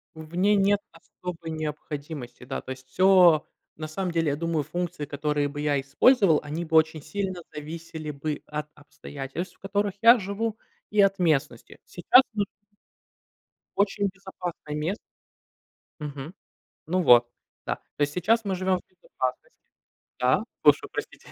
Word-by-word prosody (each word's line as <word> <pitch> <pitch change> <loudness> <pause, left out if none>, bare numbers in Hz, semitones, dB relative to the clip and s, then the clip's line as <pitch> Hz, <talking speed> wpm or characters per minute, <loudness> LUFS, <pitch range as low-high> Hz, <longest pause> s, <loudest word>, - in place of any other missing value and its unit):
В 160 +2 -10
ней 205 +3 +4
нет 200 +1 +3
особой 165 0 -8
необходимости. 150 -4 -6
Да, 135 +2 -4
то 130 - -8
есть, 130 0 -9
всё, 180 0 +5 0.3
на 155 0 -5
самом 180 +3 -3
деле, 165 -2 +1
я 140 - 0
думаю, 165 -1 -1
функции, 175 -3 -4
которые 145 0 -1
бы 145 +1 -6
я 145 -2 +1
использовал, 160 - +4
они 155 +4 -4
бы 160 0 -2
очень 155 -1 +4
сильно 185 +2 -4
зависели 155 0 -6
бы 145 +1 -4
от 150 0 -4
обстоятельств, 145 +3 -7
в - - -34
которых 200 0 -1
я 235 +1 +8
живу, 210 +3 -3 0.3
и 210 - -1
от 195 0 +3
местности. 150 -7 0
Сейчас, 245 +9 +5
ну 205 -1 +1 1.3
Очень 200 0 +1
безопасное 180 -5 -7
мест 165 +8 -1 1.0
Мгм. 145 +3 -6 0.5
Ну 180 +2 +1
вот, 120 -4 +7 0.4
да, - - -2
то 150 - -7
есть 145 0 +1
сейчас 220 +6 +2
мы 195 -1 -1
живем 185 0 +1
в - - -16
безопасности. 130 -8 -5 0.6
Да, - - +3 0.2
слушаю, - - +5
простите. - - -7
160 Hz, 150 wpm, -26 LUFS, 150-190 Hz, 1.3 s, я